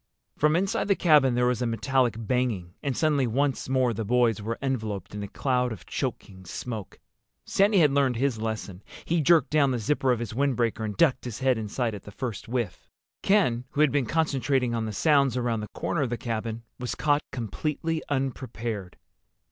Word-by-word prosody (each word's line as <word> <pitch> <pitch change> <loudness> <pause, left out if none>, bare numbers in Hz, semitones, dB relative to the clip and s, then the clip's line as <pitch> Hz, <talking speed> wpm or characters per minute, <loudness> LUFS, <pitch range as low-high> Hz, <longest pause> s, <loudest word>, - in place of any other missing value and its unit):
From 150 +1 +3
inside 190 +3 0
the 200 - +4
cabin 150 -8 +4
there 125 0 +2
was 125 -1 +1
a 125 - +1
metallic 120 +1 +1
banging, 115 -6 -1
and 140 -3 -2
suddenly 145 -5 +2
once 135 +3 0
more 130 -2 +2
the 110 +1 -3
boys 115 0 +2
were 115 +2 -3
enveloped 110 -9 -3
in 105 - -5
a 100 - -4
cloud 125 +2 0
of 110 - -8
choking 95 -1 -4
smoke. 110 +3 -6 0.5
Sandy 200 +1 +3
had 150 -5 +5
learned 135 -3 +2
his 120 -2 0
lesson. 105 -4 -4 0.2
He 170 0 +1
jerked 155 -2 +4
down 150 -2 +4
the 125 - 0
zipper 130 +3 +1
of 125 - +2
his 115 -2 -5
windbreaker 120 -3 0
and 105 -2 -4
ducked 155 -7 +3
his 120 -3 -5
head 130 -2 +2
inside 110 +2 -2
at 100 - -7
the 105 - -11
first 115 -2 -5
whiff. 120 -6 -3 0.3
Ken, 125 - +2
who 145 - +1
had 150 -3 +5
been 140 -4 +1
concentrating 135 -4 +1
on 115 -1 -1
the 110 - -3
sounds 140 +1 +3
around 120 -2 0
the 105 - -5
corner 170 - -1
of 135 - 0
the 120 - -2
cabin, 115 -1 -4 0.2
was 125 -1 -3
caught 145 -1 +2
completely 150 +7 -2
unprepared. 120 -7 -3
125 Hz, 195 wpm, -27 LUFS, 110-140 Hz, 0.5 s, had